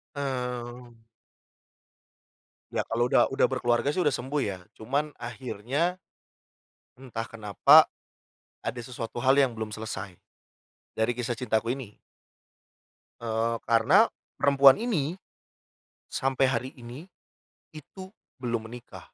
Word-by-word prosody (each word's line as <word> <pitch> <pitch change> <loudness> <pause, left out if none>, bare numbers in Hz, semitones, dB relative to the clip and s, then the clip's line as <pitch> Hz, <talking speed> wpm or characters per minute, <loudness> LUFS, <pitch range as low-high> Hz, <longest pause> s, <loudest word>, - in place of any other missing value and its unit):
Mmm. 125 -3 -5 1.7
Ya, - - -1
kalau 120 +2 0
udah - - +5
udah 135 - +2
berkeluarga 125 +1 +1
sih, 165 - -2
udah 150 -6 +2
sembuh, 135 +5 -2
ya. 95 -3 -3 0.2
Cuman 140 +7 -1
akhirnya, 125 - -2 1.0
entah 120 -4 -5
kenapa, 105 -3 +5 0.7
ada 120 +1 -4
sesuatu 120 -1 -6
hal 135 +1 +4
yang 135 -3 +4
belum 110 -1 -5
selesai. 105 -4 -6 0.8
Dari 110 +2 +1
kisah 120 -1 -2
cintaku 115 -1 0
ini. 125 -7 -9 1.2
Eee, 115 0 -1
karena, 140 - +5 0.3
perempuan 140 0 +6
ini, 170 - 0 1.0
sampai 135 0 +1
hari 130 0 -1
ini, 125 +7 -10 0.6
itu 185 +5 -11 0.3
belum 115 -3 -2
menikah. 120 +1 -11
125 Hz, 105 wpm, -27 LUFS, 115-135 Hz, 1.7 s, perempuan